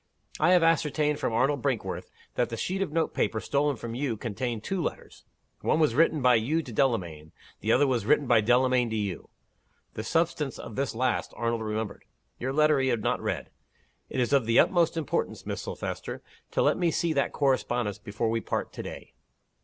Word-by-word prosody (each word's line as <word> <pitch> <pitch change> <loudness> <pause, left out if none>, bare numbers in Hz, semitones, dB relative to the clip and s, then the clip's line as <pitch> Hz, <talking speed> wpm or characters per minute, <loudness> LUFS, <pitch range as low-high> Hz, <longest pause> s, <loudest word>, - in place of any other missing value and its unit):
I 175 +4 +5
have 180 -2 +5
ascertained 150 -2 +2
from - - -1
Arnold 135 +4 +1
Brinkworth - - -2 0.2
that 120 - 0
the 115 - -4
sheet 190 +10 -2
of 195 - -1
note 165 +1 0
paper 110 +1 0
stolen 145 +4 0
from 115 0 -6
you 125 -2 -2
contained 115 0 -3
two 190 -2 -2
letters. - - -6 0.3
One 155 - +1
was 155 -7 +3
written 155 0 +3
by 125 -2 +6
you 160 +7 0
to 120 - -9
Delamayn 90 - -1 0.3
the 110 - 0
other 145 - +5
was 125 -5 +1
written 145 +6 +3
by 120 -3 +4
Delamayn 125 +2 +3
to 110 - -3
you. 100 -5 -3 0.6
The 110 - -5
substance 160 -1 0
of 110 - -8
this 135 -3 -2
last 125 +1 -1
Arnold 115 -1 -1
remembered. 110 -1 -4 0.3
Your 130 +2 -2
letter 150 0 +4
he 130 - +1
had 120 -4 0
not - - 0
read. - - -3 0.6
It - - -3
is 125 +3 +1
of 135 -5 +3
the 115 - +3
utmost 170 -2 +4
importance, 155 -4 -2
Miss - - -3
Silvester, - - -5 0.3
to - - +1
let - - +3
me 175 -2 +3
see 165 0 0
that 140 -2 +1
correspondence 120 -6 0
before 110 +2 -2
we 115 0 0
part - - -3
to - - -5
day." - - -9
125 Hz, 200 wpm, -28 LUFS, 115-150 Hz, 0.6 s, by